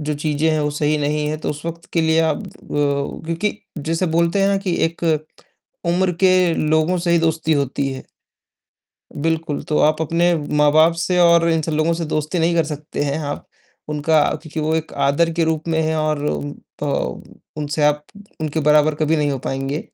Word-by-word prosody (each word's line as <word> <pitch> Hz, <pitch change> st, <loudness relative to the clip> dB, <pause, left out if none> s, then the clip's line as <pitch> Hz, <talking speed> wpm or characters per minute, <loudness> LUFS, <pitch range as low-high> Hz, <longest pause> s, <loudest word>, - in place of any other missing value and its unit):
जो 150 Hz, 0 st, -2 dB
चीज़ें 150 Hz, +1 st, 0 dB
हैं 155 Hz, -1 st, +1 dB
वो 150 Hz, -, 0 dB
सही 150 Hz, +1 st, 0 dB
नहीं 150 Hz, +1 st, 0 dB
है, 155 Hz, -, -2 dB
तो 155 Hz, -, -3 dB
उस 150 Hz, +2 st, -7 dB
वक़्त 170 Hz, 0 st, -6 dB
के 170 Hz, -, +2 dB
लिए 160 Hz, 0 st, +3 dB
आप 160 Hz, -2 st, +1 dB
अ, -, -, -9 dB, 0.8 s
क्योंकि 170 Hz, +6 st, -1 dB, 0.3 s
जैसे 165 Hz, +4 st, -1 dB
बोलते 170 Hz, +4 st, +2 dB
हैं 195 Hz, 0 st, +2 dB
कि 185 Hz, -3 st, -1 dB
एक 165 Hz, +1 st, -3 dB, 0.8 s
उम्र 180 Hz, +2 st, +2 dB
के 185 Hz, -2 st, +4 dB
लोगों 160 Hz, +4 st, +1 dB
से 170 Hz, 0 st, -1 dB
ही 170 Hz, -, +4 dB
दोस्ती 160 Hz, -1 st, +1 dB
होती 140 Hz, -1 st, 0 dB
है। 130 Hz, -, -7 dB, 1.2 s
बिल्कुल, 160 Hz, 0 st, -1 dB
तो 150 Hz, -, -1 dB
आप 155 Hz, +1 st, +3 dB
अपने 170 Hz, +3 st, +2 dB, 0.2 s
माँ-बाप 155 Hz, +3 st, +5 dB
से 170 Hz, +2 st, -1 dB
और 170 Hz, -1 st, +5 dB
इन 165 Hz, -1 st, +2 dB
सब 160 Hz, -, -3 dB
लोगों 155 Hz, +2 st, +2 dB
से 165 Hz, 0 st, -3 dB
दोस्ती 155 Hz, +3 st, -2 dB
नहीं 170 Hz, +1 st, +2 dB
कर 165 Hz, -, +3 dB
सकते 150 Hz, -1 st, -4 dB
हैं 145 Hz, +1 st, -1 dB
आप, 145 Hz, -2 st, -5 dB, 0.4 s
उनका 150 Hz, +1 st, +2 dB, 0.2 s
क्योंकि 160 Hz, 0 st, -6 dB
वो 155 Hz, +1 st, 0 dB
एक 160 Hz, 0 st, -3 dB
आदर 155 Hz, +5 st, +2 dB
के 170 Hz, 0 st, +1 dB
रूप 160 Hz, 0 st, -1 dB
में 160 Hz, -1 st, +1 dB
हैं 160 Hz, 0 st, 0 dB
और 155 Hz, -1 st, 0 dB, 0.6 s
अ, -, -, -1 dB, 0.7 s
उनसे 150 Hz, 0 st, -2 dB
आप 150 Hz, 0 st, +2 dB, 0.4 s
उनके 155 Hz, 0 st, -1 dB
बराबर 150 Hz, 0 st, +4 dB
कभी 155 Hz, +1 st, +1 dB
नहीं 145 Hz, -1 st, +1 dB
हो 135 Hz, -, -3 dB
पाएँगे, 135 Hz, +3 st, -3 dB
160 Hz, 195 wpm, -20 LUFS, 150-165 Hz, 1.2 s, माँ-बाप